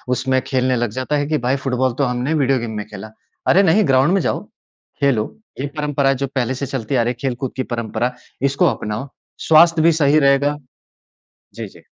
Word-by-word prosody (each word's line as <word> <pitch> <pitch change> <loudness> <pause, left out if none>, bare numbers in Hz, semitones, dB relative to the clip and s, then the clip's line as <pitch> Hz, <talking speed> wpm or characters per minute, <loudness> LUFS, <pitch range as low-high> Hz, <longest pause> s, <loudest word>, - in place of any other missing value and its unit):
उसमें 130 0 0
खेलने 130 -1 +1
लग 120 -1 -1
जाता 130 +5 -2
है 145 0 -1
कि 155 0 0
भाई 130 +2 +2
फ़ुटबॉल 130 -1 0
तो - - +3
हमने 125 +4 -1
वीडियो 135 -4 +2
गेम 115 -1 -5
में 105 - -4
खेला। 105 0 -9 0.4
अरे 195 - +5
नहीं 195 +4 +4
ग्राउंड 135 +5 +3
में 195 - +2
जाओ, - - -1 0.6
खेलो। 130 -6 +2 0.4
ये 140 - -2
परंपरा 145 -2 +1
जो 135 +1 -3
पहले 130 -1 0
से 140 - -4
चलती 135 -1 -3
आ 125 - +3
रही 120 - 0
है 125 - -8
खेलकूद 125 +1 -5
की 130 - 0
परंपरा, 120 +2 -2 0.3
इसको 140 +5 +2
अपनाओ, 110 +6 -5 0.4
स्वास्थ्य 165 +1 +6
भी 165 +1 +5
सही 145 +2 +4
रहेगा 140 +1 +2 1.0
जी, - - -6
जी। - - -18
135 Hz, 200 wpm, -19 LUFS, 125-145 Hz, 1.0 s, स्वास्थ्य